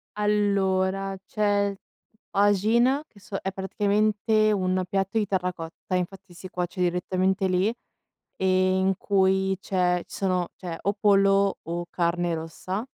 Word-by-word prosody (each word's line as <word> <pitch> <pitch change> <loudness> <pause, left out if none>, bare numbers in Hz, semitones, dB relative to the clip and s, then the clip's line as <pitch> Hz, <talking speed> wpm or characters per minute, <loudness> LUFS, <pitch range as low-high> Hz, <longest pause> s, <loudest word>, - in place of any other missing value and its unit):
Allora, 195 -2 +1
c'è 205 -1 +1 0.6
tajine 220 +8 +3
che 200 - -20
so 195 0 -6
è 190 - -2
praticamente 210 +2 +1
un 185 -2 +1
piatto 195 +2 -1
di 215 - +2
terracotta, 180 -1 -3
infatti 185 +1 -4
si 180 +2 -10
cuoce 180 +1 -4
direttamente 185 +2 +1
lì, 185 +4 +1 0.6
ehm, 185 0 +2
in 195 - +3
cui 190 -1 +2
c'è 180 -2 0
ci - - -11
sono 185 -2 0
c'è 175 -3 -6
o 200 - 0
pollo 195 -1 +4
o 170 +1 -4
carne 175 0 0
rossa, 185 +7 -5
190 Hz, 130 wpm, -25 LUFS, 185-200 Hz, 0.6 s, pollo